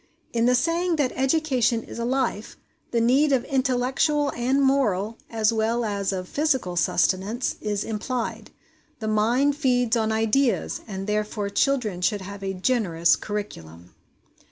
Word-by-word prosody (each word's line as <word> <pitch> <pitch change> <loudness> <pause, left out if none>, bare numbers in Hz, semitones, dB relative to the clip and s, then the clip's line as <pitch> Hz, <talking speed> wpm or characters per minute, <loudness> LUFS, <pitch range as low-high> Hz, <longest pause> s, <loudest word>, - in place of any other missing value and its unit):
In 235 0 +2
the 250 - +4
saying 335 +6 +1
that 285 -5 0
EDUCATION 265 -4 +1
IS - - -9
A 235 - -1
LIFE, 250 -4 -2 0.3
the 235 - 0
need 265 +6 +3
of 260 -2 +2
intellectual 270 +3 +1
and 255 +3 0
moral 230 -6 +1
as 220 0 +1
well 225 +2 0
as 200 -2 -1
of 185 -1 -4
physical 265 - 0
sustenance 195 +7 0
is 210 -1 -2
implied. 230 +2 -4 0.5
The 220 - -5
mind 240 +7 +2
feeds 245 -5 +2
on 220 -1 0
ideas, 225 -1 +1
and 195 -2 -5
therefore 210 -1 -2
children 225 -8 0
should 205 +2 +1
have 200 +1 -8
a 195 0 -3
generous 185 -6 +2
curriculum. 90 - -7
230 Hz, 145 wpm, -24 LUFS, 205-265 Hz, 0.5 s, the